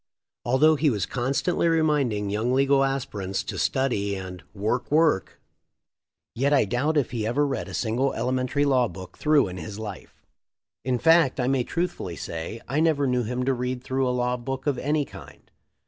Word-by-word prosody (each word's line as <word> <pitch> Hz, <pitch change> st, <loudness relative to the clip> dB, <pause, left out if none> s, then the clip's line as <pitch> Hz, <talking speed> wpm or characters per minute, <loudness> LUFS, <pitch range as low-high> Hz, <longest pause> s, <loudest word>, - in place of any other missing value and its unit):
Although 150 Hz, +6 st, +4 dB
he 150 Hz, +1 st, +3 dB
was 105 Hz, -8 st, -1 dB
constantly 135 Hz, +8 st, 0 dB
reminding 145 Hz, -11 st, +1 dB
young 110 Hz, +4 st, 0 dB
legal 135 Hz, 0 st, +4 dB
aspirants 105 Hz, -8 st, -2 dB
to -, -, -5 dB
study 105 Hz, -7 st, 0 dB
and 95 Hz, -2 st, -7 dB
"work, 110 Hz, +5 st, -2 dB
work," 150 Hz, -, +2 dB, 0.9 s
yet 135 Hz, +4 st, +1 dB
I 140 Hz, -6 st, +4 dB
doubt 140 Hz, +9 st, 0 dB
if 140 Hz, -5 st, +1 dB
he 110 Hz, -3 st, -2 dB
ever 145 Hz, +6 st, +1 dB
read 135 Hz, -11 st, -3 dB
a 95 Hz, -, -5 dB
single 125 Hz, +4 st, 0 dB
elementary 130 Hz, +4 st, 0 dB
law 130 Hz, -3 st, +3 dB
book 95 Hz, -1 st, -10 dB
through 150 Hz, -6 st, +3 dB
in 90 Hz, 0 st, -7 dB
his 100 Hz, +4 st, -7 dB
life. 105 Hz, -3 st, -9 dB, 0.6 s
In 125 Hz, +1 st, 0 dB
fact, 160 Hz, -1 st, +4 dB
I 125 Hz, -, +1 dB
may 135 Hz, -2 st, +2 dB
truthfully 165 Hz, -, -3 dB
say. 85 Hz, +9 st, -6 dB
I 140 Hz, +4 st, 0 dB
never 155 Hz, -3 st, +2 dB
knew 125 Hz, -1 st, +1 dB
him 125 Hz, +3 st, -2 dB
to 135 Hz, -, +2 dB
read 125 Hz, 0 st, -3 dB
through 130 Hz, 0 st, 0 dB
a -, -, +1 dB
law 125 Hz, 0 st, 0 dB
book 135 Hz, +2 st, -5 dB
of 140 Hz, -4 st, 0 dB
any 150 Hz, +1 st, 0 dB
kind. -, -, -14 dB
130 Hz, 180 wpm, -25 LUFS, 110-140 Hz, 0.9 s, Although